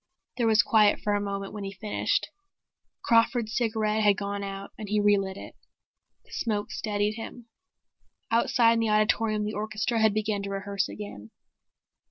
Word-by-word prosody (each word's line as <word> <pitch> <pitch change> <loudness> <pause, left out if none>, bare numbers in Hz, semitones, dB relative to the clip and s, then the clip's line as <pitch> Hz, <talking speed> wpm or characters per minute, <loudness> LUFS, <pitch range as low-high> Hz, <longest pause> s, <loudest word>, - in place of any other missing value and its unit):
There 235 -2 +2
was 220 -1 +5
quiet 215 -2 +4
for 205 - -1
a 205 - +1
moment 200 -1 -4
when 210 -1 -6
he 195 0 -5
finished. 210 +2 -1 0.7
Crawford's 230 -1 +2
cigarette 220 -2 0
had 205 -2 +4
gone 200 0 -3
out 195 0 -6
and 210 -2 -8
he 210 0 +2
relit 200 -2 +2
it. - - -9 0.7
The - - -22
smoke 210 -3 -2
steadied 210 0 -1
him. 230 +1 -9 0.8
Outside, 230 0 +4
in 230 - +1
the 225 -1 +1
auditorium 215 0 +2
the 210 - -3
orchestra 220 +2 -1
had 220 -1 +3
begun 215 -1 -1
to 200 - -5
rehearse 195 0 -2
again. 110 - -8
210 Hz, 165 wpm, -27 LUFS, 200-220 Hz, 0.8 s, was